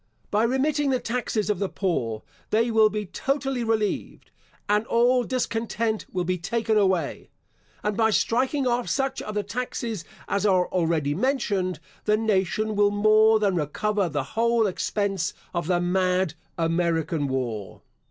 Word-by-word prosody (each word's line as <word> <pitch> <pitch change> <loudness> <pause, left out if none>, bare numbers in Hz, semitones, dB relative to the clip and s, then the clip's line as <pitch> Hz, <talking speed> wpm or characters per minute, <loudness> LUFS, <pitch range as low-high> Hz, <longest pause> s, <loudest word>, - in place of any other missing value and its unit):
By 210 +2 +3
remitting 280 +4 +1
the 260 -2 +2
taxes 235 -3 -2
of 200 - -2
the 200 - -1
poor, 120 - -2 0.3
they 230 +2 +2
will 220 -1 +5
be 210 0 -3
totally 270 +4 -2
relieved, 220 -2 -2 0.4
and 210 +2 +1
all 245 +2 +3
discontent 230 -3 -2
will 180 -1 -1
be 180 +1 -1
taken 225 +5 0
away; 190 -7 +1 0.5
and 210 0 0
by 220 0 +3
striking 260 +6 +1
off 245 0 0
such 270 -1 -1
of 215 - -6
the 210 - 0
taxes 225 -2 -4 0.2
as 200 - 0
are 185 -3 +3
already 165 -5 +1
mentioned, 200 - 0 0.3
the 210 0 +3
nation 215 0 0
will 205 0 +4
more 215 +2 +5
than 205 -3 +1
recover 185 +5 0
the 145 -3 -1
whole 230 0 +2
expense 195 -2 -1 0.2
of 170 -3 -2
the 175 -1 +2
mad 180 -1 +1 0.2
American 165 -2 0
war. 120 -7 -4
210 Hz, 150 wpm, -25 LUFS, 180-230 Hz, 0.5 s, will